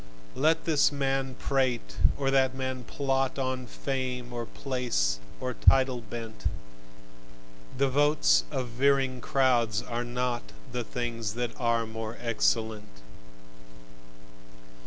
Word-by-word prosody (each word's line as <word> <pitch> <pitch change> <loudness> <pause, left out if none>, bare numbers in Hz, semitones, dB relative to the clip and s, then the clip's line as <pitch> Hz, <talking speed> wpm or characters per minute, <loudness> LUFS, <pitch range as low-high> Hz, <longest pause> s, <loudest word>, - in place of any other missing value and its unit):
Let 160 +3 +2
this 150 -3 +4
man 135 -2 -1
prate 130 -4 -1 0.2
and 135 - 0
that 130 -1 +3
man 130 -1 -3
plot, 135 -1 0
On 130 -1 -2
fame 125 -1 -3
or 120 -1 -4
place 120 - -1 0.2
or 130 0 -2
title 130 0 +4
bent: 115 0 -8 1.3
The 140 +1 +3
votes 135 - +4
of 125 - -3
veering 135 +1 +2
crowds 120 -5 +2
are 120 -1 -3
not 120 - -3 0.2
The 125 -1 -2
things 115 -3 -3
that 120 -1 -1
are 115 -2 +2
more 110 0 -6
excellent. 110 - -1
125 Hz, 115 wpm, -28 LUFS, 115-135 Hz, 1.3 s, this